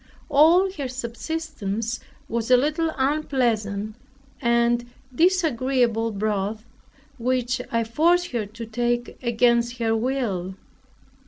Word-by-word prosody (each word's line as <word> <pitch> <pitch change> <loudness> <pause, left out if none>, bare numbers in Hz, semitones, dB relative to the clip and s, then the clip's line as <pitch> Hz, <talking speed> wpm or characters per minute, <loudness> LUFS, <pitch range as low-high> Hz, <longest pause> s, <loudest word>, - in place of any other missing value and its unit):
All 335 +7 +5
her 275 - -1
subsistence 245 -3 -4 0.3
was 230 0 -2
a 250 - +7
little 310 +5 0
unpleasant 240 -8 0 0.5
and 235 0 +2 0.2
disagreeable 255 - +2
broth, 210 +1 -2 0.5
which 250 +1 0
I 230 0 +1
forced 340 +10 +2
her 230 -4 -2
to 230 +3 -8
take 240 +1 -2
against 235 0 +2
her 225 -1 +1
will. 220 -7 -2
240 Hz, 100 wpm, -24 LUFS, 225-275 Hz, 0.5 s, a